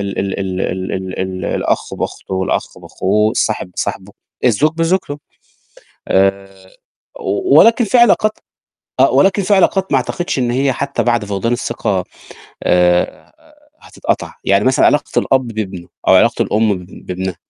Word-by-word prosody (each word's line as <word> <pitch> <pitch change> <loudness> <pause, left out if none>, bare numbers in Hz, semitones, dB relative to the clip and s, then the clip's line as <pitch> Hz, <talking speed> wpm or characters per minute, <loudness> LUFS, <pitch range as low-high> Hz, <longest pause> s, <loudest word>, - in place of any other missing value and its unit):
ال 100 -1 -4
ال 95 0 -2
ال 95 -1 -3
ال 95 0 -3
ال 95 -1 -5
ال 95 -1 -4
الأخ - - -1
بأخته 95 - -5
والأخ 95 0 -2
بأخوه، 105 +3 0
الصاحب 110 -5 -1
بصاحبه، - - -4 0.3
الزوج 130 +6 +3
بزوجته. 165 -3 -1 0.9
آآ 95 0 +2 0.7
و 100 +9 +2
ولكن 230 +1 +5
في 245 +4 +2
علاقات 225 -2 +4 0.7
آه - - +5
ولكن 195 +1 +3
في 200 +2 +3
علاقات 190 0 +2
ما 135 - +4
اعتقدش 135 +4 -2
إن 120 -1 0
هي 135 +2 +1
حتى 140 +2 -2
بعد 120 -3 +1
فقدان 105 +4 -1
الثقة، 110 -6 -2 0.6
آآ 90 0 +1 0.5
هتتقطع. - - -3
يعني 100 +1 +2
مثلًا 130 0 +3
علاقة 145 0 +2
الأب 130 -2 +1
بابنه 100 -6 -5 0.2
أو - - +7
علاقة - - +3
الأم 105 -1 +1
ب 90 0 -13
بابنها. 95 0 -4
110 Hz, 145 wpm, -16 LUFS, 95-140 Hz, 0.9 s, أو